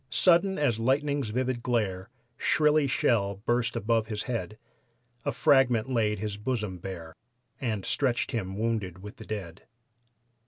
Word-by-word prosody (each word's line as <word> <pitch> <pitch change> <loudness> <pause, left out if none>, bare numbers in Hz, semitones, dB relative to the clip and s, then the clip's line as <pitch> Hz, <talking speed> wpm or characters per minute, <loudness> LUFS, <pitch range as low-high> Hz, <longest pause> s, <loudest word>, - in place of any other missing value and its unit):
Sudden 190 +2 +4
as 125 -7 +1
lightning's 140 +1 +1
vivid 125 +1 -1
glare 110 -6 -1 0.3
Shrilly 150 +2 +3
shell 100 -6 +1
burst 120 -1 +1
above 110 +1 +1
his 105 -2 -3
head; 115 -4 -4 0.7
A - - +1
fragment 130 -3 +3
laid 110 -4 +1
his 105 0 -4
bosom 105 -5 -3
bare 85 -3 -7 0.5
And 110 -8 -2
stretched 125 -4 0
him 95 -4 -3
wounded 105 -5 -2
with 105 +3 -9
the 110 - -11
dead. 95 -5 -6
115 Hz, 135 wpm, -28 LUFS, 105-130 Hz, 0.7 s, Sudden